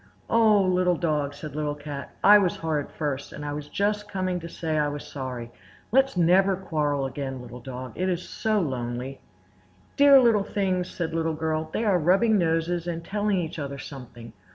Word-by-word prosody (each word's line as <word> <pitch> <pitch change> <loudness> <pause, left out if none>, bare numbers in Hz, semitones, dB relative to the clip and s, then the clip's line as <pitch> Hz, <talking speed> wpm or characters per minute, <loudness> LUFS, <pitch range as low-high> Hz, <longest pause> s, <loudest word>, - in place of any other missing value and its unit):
"Oh! 215 -3 +5
Little 180 -1 +2
Dog," 150 -4 -1
said 150 0 -8
Little 150 -1 -2
Cat, 145 -1 -7
"I 210 +1 +9
was 185 -4 +1
horrid 155 -3 -2
first, 145 -3 -4
and 150 - -7
I 145 - -3
was 145 0 -6
just 210 +1 -1
coming 185 -2 -1
to 170 0 -8
say 160 -2 -2
I 150 - +2
was 145 0 -5
sorry. 125 -4 -6 0.4
Let's 270 -3 +3
never 185 +3 +4
quarrel 150 -6 -1
again, 135 0 -4
Little 125 0 -9
Dog; 125 0 -7
it 185 +1 -1
is 180 0 -2
so 215 -1 0
lonely!" 130 -3 -3 0.8
"Dear 280 -1 +8
little 230 -5 +4
things!" 185 -3 -1
said 165 -2 -4
Little 165 -1 0
Girl. 155 0 -2
"They 225 - -1
are 195 -4 +3
rubbing 195 +6 +3
noses 165 +1 0
and 165 -1 -4
telling 205 -1 0
each 165 -2 -3
other 140 -1 -4
something. 120 -4 -10
165 Hz, 185 wpm, -26 LUFS, 145-190 Hz, 0.8 s, I